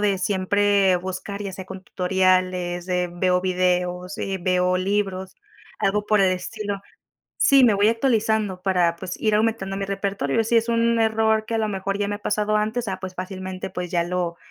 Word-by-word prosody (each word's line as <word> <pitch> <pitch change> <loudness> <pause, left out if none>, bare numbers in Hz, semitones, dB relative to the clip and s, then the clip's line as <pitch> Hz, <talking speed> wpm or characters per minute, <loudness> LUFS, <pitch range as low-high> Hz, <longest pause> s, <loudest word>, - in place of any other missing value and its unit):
de 200 -2 +1
siempre 200 0 +2
buscar, 190 +3 -5
ya 200 -2 -4
sea, 190 0 -8
con 190 0 -9
tutoriales 185 -1 +1
de 180 -1 0
veo 180 0 +1
videos, 180 +1 -1
eh, 195 -1 -2
veo 180 0 +2
libros, 190 -1 -2 0.4
algo 205 +1 +1
por 210 -1 +3
el 190 -1 +4
estilo 205 +1 -4 0.6
Sí, 270 -2 +5
me 220 - +4
voy 205 +2 +4
actualizando 220 -5 0
para, 180 -3 +2
pues, 180 +1 -6
ir 215 -1 +2
aumentando 215 -3 0
mi 195 - -3
repertorio. 195 -4 -1
Si 235 - +1
es 230 +1 +2
un 230 0 +2
error 220 0 +2
que 230 - -3
a - - +1
lo 220 -1 0
mejor 195 0 -3
ya 205 0 -1
me 205 - -2
ha - - -9
pasado 210 0 0
antes, 220 +2 -1
ah, 190 -1 -3
pues, 185 0 -6
fácilmente, 185 0 -6
pues, 180 -1 -5
ya 170 -1 +1
lo 175 -1 -2
195 Hz, 190 wpm, -23 LUFS, 185-210 Hz, 0.6 s, Sí